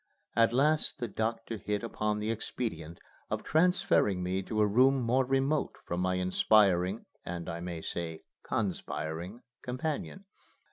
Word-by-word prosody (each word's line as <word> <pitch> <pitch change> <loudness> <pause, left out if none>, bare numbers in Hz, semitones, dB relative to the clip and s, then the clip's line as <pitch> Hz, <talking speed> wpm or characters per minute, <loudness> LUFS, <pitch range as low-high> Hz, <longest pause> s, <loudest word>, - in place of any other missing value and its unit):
At 115 -1 +5
last 150 +5 +2
the 120 - -3
doctor 115 +1 -2
hit 105 +2 -2
upon 105 -2 -1
the 105 +1 -1
expedient 85 -7 -4 0.3
of - - -2
transferring 155 - +3
me 95 +1 -1
to 110 +3 -3
a - - +6
room 130 +6 +4
more 125 +2 +2
remote 135 +3 +1
from 85 - -2
my 90 0 +1
inspiring, 95 +1 +3 0.2
and, 85 -1 -5
I 85 - -4
may 85 -1 -5
say, 80 -2 -4 0.2
conspiring, 90 0 -3 0.2
companion. 150 +9 -4
105 Hz, 140 wpm, -31 LUFS, 90-125 Hz, 0.3 s, a